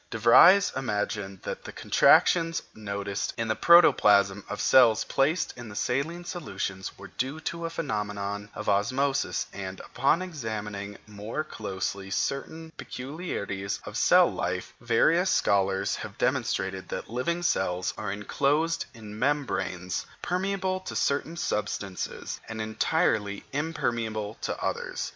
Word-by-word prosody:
De - - -4
Vries 175 - +7
imagined 105 -5 -2
that - - -5
the - - -7
contractions 165 -1 +4
noticed 100 -1 -4
in 115 -1 -1
the 110 - +1
protoplasm 100 - +5
of 105 - -4
cells 115 -2 +5
placed 145 +6 +1
in 115 -4 -9
saline 155 +10 -1
solutions 95 - -5
were - - -11
due 135 +5 -1
to 170 +1 -4
a - - -5
phenomenon 105 -9 -3
of 105 - -6
osmosis, 130 +7 +1
and, 95 -1 -6
upon 135 +6 +1
examining 105 - -5
more 105 +8 -5
closely 100 -6 -4
certain 160 +10 -3
peculiarities 125 - -4
of - - -8
cell - - +6
life, - - -3
various 175 +3 +3
scholars 95 -1 +2
have - - -8
demonstrated 95 0 -1
that - - -5
living 170 +9 -1
cells 90 - 0
are 105 - -4
enclosed 145 +10 0
in 105 -1 -9
membranes 125 - -1 0.2
permeable 185 +1 -1
to 185 - -7
certain 150 +4 0
substances 100 - -3
and 110 0 -5
entirely 110 -1 0
impermeable 115 -8 -2
to - - -3
others. - - -2
110 Hz, 125 wpm, -27 LUFS, 100-155 Hz, 0.2 s, Vries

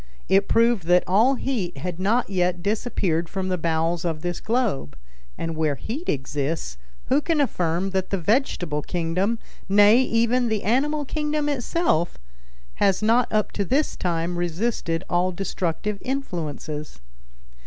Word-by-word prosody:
It 195 +1 +3
proved 230 -5 +3
that 180 0 +5
all 225 +9 +4
heat 220 - -2
had 175 +4 -5
not 220 +6 +2
yet 180 -2 0
disappeared 195 -6 0
from 190 -1 -3
the 185 - 0
bowels 165 +1 0
of 165 -3 -2
this 175 -1 -2
globe; 215 - -1 0.4
and 165 -1 -3
where 155 -2 +1
heat 275 - -5
exists, 135 - -2 0.3
who 275 +3 +4
can 325 0 0
affirm 180 - 0
that 190 -1 -1
the 195 - 0
vegetable 175 - 0
kingdom, 180 +7 -1 0.3
nay, 205 +3 +7
even 235 0 +2
the 220 -2 -1
animal 290 +7 +1
kingdom 300 +1 -1
itself, 280 - 0 0.6
has 195 +1 +3
not 230 +3 +3
up 215 -1 +1
to 200 - -1
this 275 - 0
time 175 0 -1
resisted 175 -1 -1
all 180 +1 +1
destructive 195 +2 -3
influences? 155 - -4
190 Hz, 145 wpm, -24 LUFS, 170-235 Hz, 0.6 s, nay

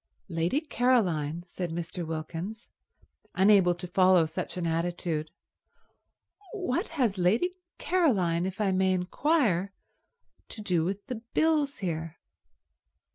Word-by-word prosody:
"Lady 170 - 0
Caroline?" 180 - +1
said 175 0 -5
Mr. 170 +1 -4
Wilkins, 165 +7 -5 0.7
unable 190 -2 +5
to 175 +1 -7
follow 185 -1 +4
such 155 - -5
an 175 - -2
attitude. 165 -1 -2 1.2
"What 360 - -1
has 225 -8 +1
Lady 220 - +2 0.2
Caroline, 190 - +1
if 190 +2 -7
I 205 -2 +2
may 190 0 +2
inquire, 200 - +1 0.8
to - - -7
do 175 -5 +1
with 195 +4 -3
the 250 -5 -5
bills 305 -3 +2
here?" 165 -1 -4
185 Hz, 115 wpm, -28 LUFS, 170-230 Hz, 1.2 s, unable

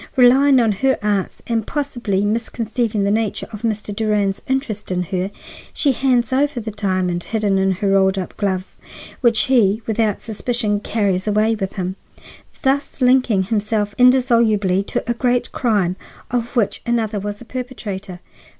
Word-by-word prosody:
Relying 265 +1 +6
on 230 -3 +3
her 265 +7 +1
arts, 205 -3 -1
and 225 -2 -1
possibly 240 -9 -1
misconceiving 225 0 -1
the 200 - +1
nature 220 0 -1
of 210 - -7
Mr. 215 -2 -2
Durand's 205 -2 0
interest 255 -7 -2
in 180 0 0
her, 185 +1 -2 0.5
she 285 - +2
hands 255 -2 +1
over 280 0 +1
the 220 -1 -5
diamond 185 -4 -1
hidden 205 -3 0
in 190 0 +2
her 195 +2 -1
rolled 195 0 +3
up 185 - -4
gloves, 190 -2 -2 0.4
which 235 -4 +4
he, 225 -4 +2
without 220 -2 0
suspicion, 220 -1 -1
carries 200 -3 -1
away 215 +2 +2
with 195 -3 -3
him, 185 -1 -4 0.7
thus 275 +1 0
linking 250 -6 +3
himself 210 0 -1
indissolubly 230 -7 +4
to - - -2
a 240 - 0
great 245 0 0
crime 205 -8 +1 0.4
of 240 +1 -2
which 225 -5 0
another 225 -3 0
was 205 +1 -4
the 240 - -13
perpetrator. 205 -8 -6
215 Hz, 155 wpm, -20 LUFS, 200-245 Hz, 0.7 s, Relying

